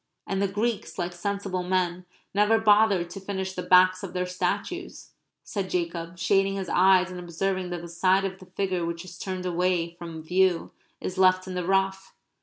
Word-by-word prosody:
"And 195 Hz, 0 st, -2 dB
the 200 Hz, -, +2 dB
Greeks, 210 Hz, +3 st, -2 dB
like 175 Hz, -1 st, -2 dB
sensible 195 Hz, 0 st, -3 dB
men, 180 Hz, -1 st, -1 dB, 0.3 s
never 210 Hz, +3 st, +4 dB
bothered 205 Hz, -5 st, +4 dB
to 195 Hz, -, -7 dB
finish 190 Hz, -1 st, -4 dB
the 180 Hz, -, -4 dB
backs 185 Hz, 0 st, +5 dB
of 190 Hz, -3 st, -7 dB
their 180 Hz, 0 st, -1 dB
statues," 200 Hz, -, -3 dB, 0.3 s
said 195 Hz, -4 st, -4 dB
Jacob, 170 Hz, -1 st, -3 dB
shading 195 Hz, +2 st, +2 dB
his 190 Hz, -2 st, -4 dB
eyes 185 Hz, 0 st, +4 dB
and 180 Hz, -, -6 dB
observing 180 Hz, +2 st, -2 dB
that 175 Hz, -1 st, -5 dB
the -, -, -6 dB
side 185 Hz, +3 st, +2 dB
of 190 Hz, 0 st, -4 dB
the 185 Hz, -, -14 dB
figure 185 Hz, -1 st, -2 dB
which 170 Hz, +1 st, -4 dB
is 180 Hz, 0 st, -11 dB
turned 185 Hz, -1 st, -4 dB
away 175 Hz, -1 st, 0 dB
from 165 Hz, -2 st, -7 dB
view 180 Hz, +1 st, +2 dB, 0.3 s
is 185 Hz, 0 st, -5 dB
left 185 Hz, 0 st, +4 dB
in 185 Hz, -, -5 dB
the 180 Hz, -1 st, -3 dB
rough. 195 Hz, 0 st, 0 dB
185 Hz, 190 wpm, -26 LUFS, 180-195 Hz, 0.3 s, backs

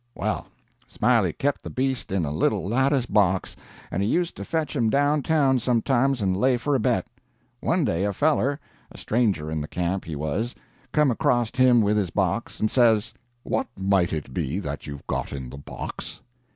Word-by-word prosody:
"Well, -, -, -2 dB, 0.4 s
Smiley 115 Hz, -8 st, +2 dB
kep' 145 Hz, 0 st, -1 dB
the -, -, -7 dB
beast 130 Hz, -3 st, -2 dB
in 95 Hz, -4 st, 0 dB
a 70 Hz, -, -3 dB
little 80 Hz, +4 st, 0 dB
lattice 135 Hz, +3 st, +2 dB
box, 95 Hz, -4 st, +1 dB, 0.4 s
and 90 Hz, -, -1 dB
he 100 Hz, -, +1 dB
used 175 Hz, +4 st, 0 dB
to -, -, -5 dB
fetch 160 Hz, -2 st, -2 dB
him 115 Hz, -5 st, +2 dB
down 145 Hz, +3 st, +2 dB
town 140 Hz, -3 st, +2 dB
sometimes 125 Hz, +1 st, +1 dB
and 95 Hz, -1 st, +1 dB
lay 125 Hz, +5 st, +3 dB
for 145 Hz, +5 st, -1 dB
a 135 Hz, -, +3 dB
bet. -, -, +1 dB, 0.5 s
One -, -, +1 dB
day 85 Hz, +3 st, 0 dB
a 105 Hz, -, +1 dB
feller 145 Hz, +4 st, +1 dB, 0.3 s
a -, -, -12 dB
stranger 105 Hz, -10 st, 0 dB
in 80 Hz, -1 st, -2 dB
the 75 Hz, -, -5 dB
camp, 90 Hz, +3 st, -2 dB
he 80 Hz, -, -5 dB
was 80 Hz, +12 st, -2 dB, 0.4 s
come 150 Hz, -3 st, +3 dB
acrost 120 Hz, 0 st, +1 dB
him 130 Hz, -2 st, +5 dB
with 105 Hz, +1 st, +2 dB
his 100 Hz, -4 st, 0 dB
box, -, -, -1 dB
and 110 Hz, -, +1 dB
says: 115 Hz, -3 st, +3 dB, 0.3 s
"'What -, -, -1 dB
might 95 Hz, -2 st, +2 dB
it 75 Hz, -5 st, -4 dB
be 70 Hz, +8 st, -2 dB
that 75 Hz, -7 st, -5 dB
you've 70 Hz, -1 st, -8 dB
got -, -, -3 dB
in 65 Hz, -3 st, -6 dB
the 70 Hz, -, -8 dB
box?' -, -, -7 dB
110 Hz, 190 wpm, -25 LUFS, 90-130 Hz, 0.5 s, him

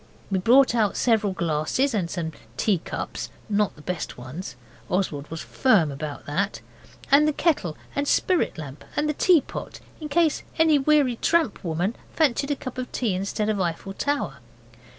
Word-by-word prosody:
We 190 Hz, -, +2 dB
brought 250 Hz, +7 st, +5 dB
out 220 Hz, -4 st, +1 dB
several 220 Hz, -4 st, +2 dB
glasses 170 Hz, -, 0 dB
and 185 Hz, -6 st, 0 dB
some 165 Hz, -3 st, -3 dB, 0.3 s
teacups 195 Hz, -6 st, -2 dB, 0.2 s
not 210 Hz, -1 st, +1 dB
the 150 Hz, -, -15 dB
best 180 Hz, -1 st, -4 dB
ones, 130 Hz, +9 st, -7 dB, 0.3 s
Oswald 155 Hz, -6 st, -1 dB
was 165 Hz, 0 st, -5 dB
firm 200 Hz, -, +3 dB
about 145 Hz, +1 st, -6 dB
that 195 Hz, +8 st, -1 dB, 0.5 s
and 295 Hz, +2 st, +6 dB
the -, -, +3 dB
kettle 285 Hz, -, 0 dB, 0.2 s
and 285 Hz, 0 st, 0 dB
spirit 365 Hz, +4 st, +2 dB
lamp 145 Hz, -2 st, -8 dB
and 300 Hz, -, +1 dB
the 300 Hz, -, +1 dB
tea 340 Hz, +1 st, +5 dB
pot, -, -, -7 dB, 0.2 s
in 305 Hz, -2 st, -6 dB
case 325 Hz, 0 st, +2 dB, 0.2 s
any 320 Hz, -2 st, +5 dB
weary 275 Hz, -4 st, +3 dB
tramp 330 Hz, -6 st, +1 dB
woman 175 Hz, +6 st, -1 dB, 0.2 s
fancied 280 Hz, -3 st, +2 dB
a 290 Hz, -, +1 dB
cup 255 Hz, -1 st, -7 dB
of 255 Hz, -, -5 dB
tea 230 Hz, -6 st, 0 dB
instead 200 Hz, +3 st, -1 dB
of 210 Hz, -3 st, 0 dB
Eiffel 175 Hz, +2 st, -2 dB
Tower. 285 Hz, +7 st, -1 dB
210 Hz, 170 wpm, -25 LUFS, 170-285 Hz, 0.5 s, and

